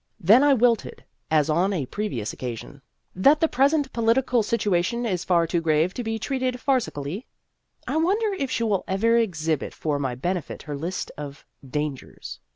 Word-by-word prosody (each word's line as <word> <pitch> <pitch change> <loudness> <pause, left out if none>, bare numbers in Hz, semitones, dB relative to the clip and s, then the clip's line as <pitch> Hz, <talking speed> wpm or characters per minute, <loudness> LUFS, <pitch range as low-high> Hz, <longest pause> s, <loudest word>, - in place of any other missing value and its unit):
Then 215 +8 +6
I 290 -1 +5
wilted, 235 -2 +1 0.3
as 155 -2 +3
on 175 +5 +2
a 155 -8 -1
previous 130 - -4
occasion. 125 +3 -7 0.2
" - - -47
that 300 +2 +7
the 325 - +3
present 280 +1 +2
political 235 +1 +2
situa 205 -5 +1
tion 235 +6 -2
is 185 -6 -1
far 170 -2 +3
too 170 +1 -1
grave 160 +2 +2
to 245 - -4
be 225 0 -2
treated 255 +2 -1
farci 255 -1 0
cally? 145 - -6 0.3
" - - -38
I - - -1
wonder 400 +6 +1
if 275 -9 -2
she 230 - -1
will 205 -4 +1
ever 225 +5 +2
exhibit 160 - -1
for 150 -2 -1
my 130 -3 -2
benefit 175 +6 -3
her 150 -1 -5
list 170 +6 -4
of 145 -1 -8
" 135 - -16
Dangers." 150 -3 -6
195 Hz, 190 wpm, -24 LUFS, 155-245 Hz, 0.3 s, that